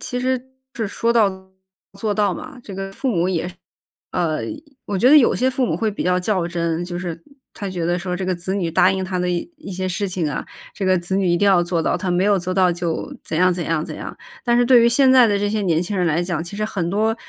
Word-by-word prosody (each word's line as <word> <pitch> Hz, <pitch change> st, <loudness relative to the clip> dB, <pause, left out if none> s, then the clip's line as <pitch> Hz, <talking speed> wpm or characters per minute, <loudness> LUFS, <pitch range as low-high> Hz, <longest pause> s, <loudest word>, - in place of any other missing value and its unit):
其 250 Hz, -, -4 dB
实 255 Hz, 0 st, 0 dB, 0.3 s
是 225 Hz, -3 st, -2 dB
说 230 Hz, +3 st, 0 dB
到 190 Hz, -4 st, +1 dB, 0.5 s
做 210 Hz, 0 st, -1 dB
到 205 Hz, -3 st, +2 dB
嘛， 270 Hz, -, -8 dB
这 195 Hz, -, -8 dB
个 195 Hz, 0 st, -5 dB
父 265 Hz, +6 st, -3 dB
母 175 Hz, -3 st, +1 dB
也 175 Hz, -2 st, -1 dB, 0.7 s
呃， 165 Hz, -4 st, 0 dB, 0.5 s
我 200 Hz, -, -2 dB
觉 245 Hz, +6 st, +4 dB
得 305 Hz, -, +9 dB
有 260 Hz, -, +5 dB
些 255 Hz, +2 st, +1 dB
父 260 Hz, 0 st, 0 dB
母 -, -, -1 dB
会 225 Hz, -, 0 dB
比 210 Hz, -, -4 dB
较 180 Hz, 0 st, +2 dB
较 185 Hz, -2 st, 0 dB
真， 170 Hz, 0 st, -2 dB
就 175 Hz, 0 st, -5 dB
是 170 Hz, -2 st, -6 dB, 0.3 s
他 200 Hz, -3 st, -5 dB
觉 175 Hz, -3 st, -3 dB
得 175 Hz, +1 st, +1 dB
说 180 Hz, 0 st, -3 dB
这 190 Hz, -, -3 dB
个 185 Hz, -1 st, 0 dB
子 175 Hz, +2 st, -4 dB
女 180 Hz, -4 st, -1 dB
答 185 Hz, +3 st, +4 dB
应 190 Hz, 0 st, -2 dB
他 185 Hz, 0 st, -3 dB
的 180 Hz, 0 st, 0 dB
一 175 Hz, -, -2 dB
一 300 Hz, -10 st, -9 dB
些 185 Hz, +1 st, -3 dB
事 185 Hz, +2 st, -2 dB
情 175 Hz, -4 st, -1 dB
啊， 140 Hz, -, -4 dB, 0.3 s
这 195 Hz, -, -3 dB
个 185 Hz, 0 st, +4 dB
子 175 Hz, +2 st, -3 dB
女 195 Hz, 0 st, +1 dB
一 175 Hz, 0 st, +3 dB
定 205 Hz, -, +2 dB
要 180 Hz, -3 st, +5 dB
做 170 Hz, -1 st, -1 dB
到， -, -, +1 dB
他 185 Hz, -3 st, -2 dB
没 180 Hz, +2 st, +2 dB
有 205 Hz, -1 st, +4 dB
做 185 Hz, +1 st, -3 dB
到 185 Hz, -1 st, +4 dB
就 170 Hz, -1 st, -3 dB
怎 160 Hz, -, -3 dB
样 185 Hz, +1 st, +4 dB
怎 175 Hz, 0 st, -3 dB
样 165 Hz, -1 st, -1 dB
怎 -, -, -7 dB
样。 -, -, -8 dB, 0.3 s
但 240 Hz, -1 st, +2 dB
是 245 Hz, -, +4 dB
对 245 Hz, -1 st, +6 dB
于 235 Hz, -, +5 dB
现 265 Hz, +2 st, +4 dB
在 255 Hz, -2 st, +7 dB
的 205 Hz, -2 st, +1 dB
这 205 Hz, 0 st, 0 dB
些 215 Hz, 0 st, -1 dB
年 170 Hz, -3 st, +1 dB
轻 195 Hz, +3 st, -3 dB
人 180 Hz, -1 st, +1 dB
来 165 Hz, +1 st, +1 dB
讲， 170 Hz, -3 st, -2 dB
其 200 Hz, +4 st, -8 dB
实 215 Hz, -, 0 dB
很 185 Hz, -6 st, -2 dB
多 215 Hz, +4 st, +1 dB
185 Hz, 295 characters per minute, -21 LUFS, 175-210 Hz, 0.7 s, 得